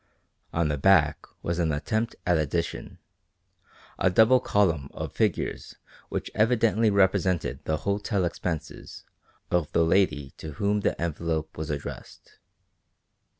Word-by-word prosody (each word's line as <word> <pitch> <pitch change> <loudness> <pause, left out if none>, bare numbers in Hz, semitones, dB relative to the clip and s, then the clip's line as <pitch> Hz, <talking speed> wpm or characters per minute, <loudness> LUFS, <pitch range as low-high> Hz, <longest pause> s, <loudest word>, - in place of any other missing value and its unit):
On 85 -1 +1
the 75 -1 -1
back 80 -3 +3 0.2
was 85 +1 -2
an 80 -2 +1
attempt 110 +10 -1
at 90 - +3
addition, 80 +2 -2 1.0
a - - +3
double 110 +7 +5
column 85 - +1
of - - -5
figures - - -1 0.3
which - - -4
evidently 115 0 +3
represented 95 -3 +1
the 80 - 0
hotel 100 -1 0
expenses 85 -1 -5 0.5
of 85 -4 +1
the 85 - +3
lady 75 -6 +1
to 80 -1 -7
whom 100 +7 0
the - - -1
envelope 80 -1 -2
was 80 -1 -5
addressed. 75 -1 -7
85 Hz, 125 wpm, -26 LUFS, 80-100 Hz, 1.0 s, double